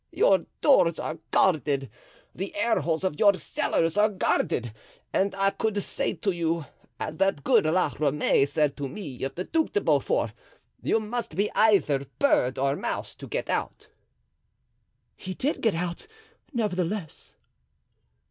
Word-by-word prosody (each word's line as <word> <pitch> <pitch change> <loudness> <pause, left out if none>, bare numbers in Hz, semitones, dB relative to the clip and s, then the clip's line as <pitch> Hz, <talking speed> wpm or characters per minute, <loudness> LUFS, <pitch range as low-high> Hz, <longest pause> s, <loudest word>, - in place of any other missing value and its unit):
Your 485 +4 +3
doors 175 - +5
are 155 - -4
guarded, 145 -6 +2 0.5
the 195 +3 -5
airholes 170 - +1
of 185 -6 -1
your 200 -2 +6
cellars 165 -1 -1
are 210 +1 +5
guarded, 120 - 0 0.4
and 195 0 +1
I 195 0 +2
could 215 -1 -1
say - - -2
to 195 +4 -1
you, 165 -2 -1 0.3
as 155 - -4
that 195 -7 +1
good - - +4
La 180 +4 +2
Ramee 145 -1 +2
said 145 0 +1
to 140 -2 -4
me 145 -5 -8
of 135 0 -3
the 180 - -3
Duc 320 +9 -1
de 415 - +2
Beaufort, - - +1 0.5
you 225 - +2
must 220 -5 -4
be 200 +3 0
either 175 -11 +3
bird 130 - +2
or 135 +1 +1
mouse - - -4
to - - -11
get - - -3
out." - - -3 1.3
"He 185 0 -7
did 285 - -1
get 225 -6 +2
out, 175 - -4 0.4
nevertheless." 195 - -3
180 Hz, 150 wpm, -26 LUFS, 150-210 Hz, 1.3 s, your